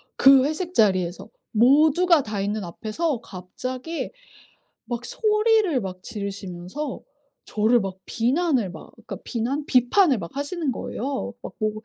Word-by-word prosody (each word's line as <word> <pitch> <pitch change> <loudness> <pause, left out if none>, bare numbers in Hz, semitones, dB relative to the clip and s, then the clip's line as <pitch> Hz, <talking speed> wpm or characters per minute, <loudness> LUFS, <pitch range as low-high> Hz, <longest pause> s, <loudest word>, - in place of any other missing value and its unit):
그 270 -1 +7
회식 340 +4 -3
자리에서 185 - +1 0.2
모두가 300 +7 +5
다 210 -2 -4
있는 205 +1 -2
앞에서 225 - -2
갑자기 255 - -6 0.7
막 240 0 -4
소리를 425 - +2
막 185 -2 -6
지르시면서 200 +5 -5 0.4
저를 220 +3 +2
막 190 -1 -4
비난을 255 - +1
막 - - -11
그러니까 - - -9
비난 260 +5 -2
비판을 260 - +4
막 170 +9 -8
하시는 290 +1 -2
거예요. 260 0 -4
막 - - -7
뭐 215 -1 +1
250 Hz, 275 characters per minute, -24 LUFS, 205-305 Hz, 0.7 s, 그